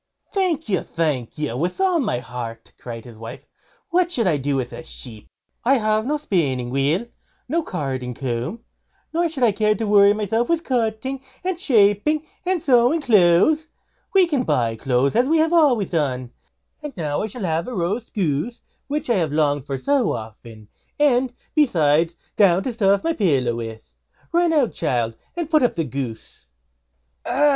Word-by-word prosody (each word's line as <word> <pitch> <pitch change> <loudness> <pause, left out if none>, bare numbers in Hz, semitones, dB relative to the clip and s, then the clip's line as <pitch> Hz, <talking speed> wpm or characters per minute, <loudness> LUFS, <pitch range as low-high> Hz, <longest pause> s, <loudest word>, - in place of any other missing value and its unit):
"Thank 360 -5 0
you! 190 -4 +1
thank 150 -8 -2
you! 150 -6 -2
with 175 - -2
all 375 -3 +3
my 240 - 0
heart", 115 -1 -7
cried 115 -1 -8
his 115 -3 -12
wife; 115 +3 -9 0.5
"what 350 0 +2
should 240 -9 +1
I 165 -5 +2
do 140 0 -1
with 130 -2 -2
a - - -8
sheep? 115 -8 -9 0.3
I 270 +3 +4
have 215 -1 +1
no 300 +2 +1
spinning 140 - -1
wheel, 145 - +1 0.4
nor 330 +5 0
carding 130 - -4
comb, 130 - -3 0.5
nor 340 +1 +1
should 285 -5 -3
I 230 - +5
care 210 +1 +2
to 225 - -3
worry 205 -1 +6
myself 215 +3 -1
with 335 -1 +1
cutting, 250 +1 -1 0.2
and 365 -2 -2
shaping, 250 - +3 0.2
and 370 -1 +2
sewing 260 +2 +3
clothes. 220 - +4 0.5
We 380 -2 +7
can 295 -7 0
buy 115 - 0
clothes 130 +3 +1
now, 240 - +5
as 255 - -3
we 325 +3 +3
have 320 +1 +2
always 275 - +3
done; 130 -7 -1 0.5
and 295 -6 -8
now 150 -4 -1
I 215 - -2
shall 220 +1 -7
have 165 +1 -1
roast 215 0 -3
goose, 190 - -1 0.3
which 295 +2 -3
I 235 -4 +2
have 165 -5 0
longed 145 -3 +1
for 135 - -2
so 270 - +1
often; 110 0 -9 0.3
and, 260 -3 +3 0.2
besides, 165 - +3 0.2
down 190 -3 +4
to 255 - -3
stuff 200 -3 +2
my 330 - +1
little 215 - 0
pillow 130 -6 +1
with. 115 - -7 0.4
Run 345 0 +3
out, 290 -7 +2
child, 120 -7 -1 0.2
and 340 -3 -2
put 310 -1 +3
up 245 - +2
the 165 - 0
goose." 125 - -6 0.8
"Ah!" 250 - -2
200 Hz, 180 wpm, -22 LUFS, -, 0.8 s, We